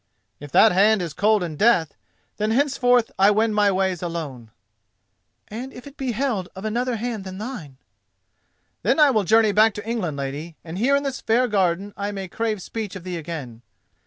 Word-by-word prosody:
"If 145 -1 -10
that 220 - +7
hand 210 +4 +4
is 170 -4 -4
cold 210 +1 +2
in 165 -3 -5
death, 200 -7 +3 0.4
then 215 +1 0
henceforth 250 -2 +2
I 195 +1 +6
wend 215 +1 +2
my 205 -1 +3
ways 190 -2 0
alone." 155 -10 -5 1.0
"And 245 +5 -7
if 245 - -12
it 285 0 -12
be 260 -4 -3
held 225 -7 -2
of 190 +3 -8
another 240 +3 -1
hand 225 -2 -4
than 190 0 -8
thine?" 195 - -7 1.0
"Then - - +1
I 295 -2 +6
will 215 -5 +1
journey 220 +2 +4
back 215 +1 +4
to 210 +1 -7
England, 195 -11 -2
lady, 145 +4 -5
and 170 +2 -7
here 270 +5 +3
in 280 - 0
this 275 -2 -4
fair 245 +3 +2
garden 195 -1 0
I 200 +1 -3
may 195 -2 -5
crave 215 0 -3
speech 215 -4 -5
of 185 - -8
thee 180 -1 -4
again." 145 -8 -7
210 Hz, 190 wpm, -23 LUFS, 175-230 Hz, 1.0 s, that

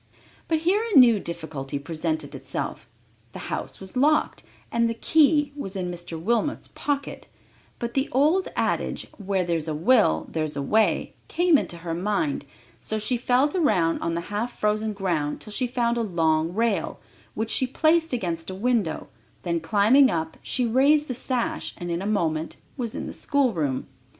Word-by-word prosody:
But 320 -1 +1
here 385 +6 +2
a 455 -9 +2
new 235 -5 +7
difficulty 160 -6 -5
presented 155 0 -3
itself. - - -5 0.4
The - - -5
house - - -4
was 190 +3 -9
locked 300 +4 +2 0.3
and 235 0 +2
the 230 - -2
key 295 +2 +3
was 200 -9 -6
in 180 -2 -2
Mr. 175 -2 -6
Wilmot's 235 - 0
pocket; 285 -1 -3 0.5
but 235 0 -4
the 270 +2 0
old 310 +8 +3
adage, - - -1 0.2
"where 190 -1 0
there's 165 -2 -1
a 155 - -2
will, 155 - +3
there's 155 -2 -2
a 140 - -2
way," 220 +9 +2
came 350 -1 +3
into 175 -11 0
her 165 0 -5
mind, 170 -6 -1 0.3
so 220 - -3
she 215 +4 -1
felt 250 +4 +2
around 205 - +2
on 165 - -1
the 170 - -1
half 235 +4 -3
frozen 215 +1 0
ground 170 -7 -1
till 215 - -7
she 250 +3 0
found 240 -1 0
a - - +1
long 165 -5 +1
rail, 225 +2 0 0.4
which 220 0 -2
she 260 - +2
placed 320 +5 +2
against 175 -9 -2
a 185 - -5
window; 215 -6 0 0.4
then 170 -2 0
climbing 215 - +5
up, 160 -3 -2
she 250 - -1
raised 280 +6 +3
the - - -1
sash, 250 0 -2
and 175 0 -5
in 170 +1 -1
a 195 - -3
moment 165 -6 -1 0.2
was 240 -5 -4
in - - -4
the - - -6
schoolroom. 180 - 0
215 Hz, 175 wpm, -25 LUFS, 170-255 Hz, 0.5 s, new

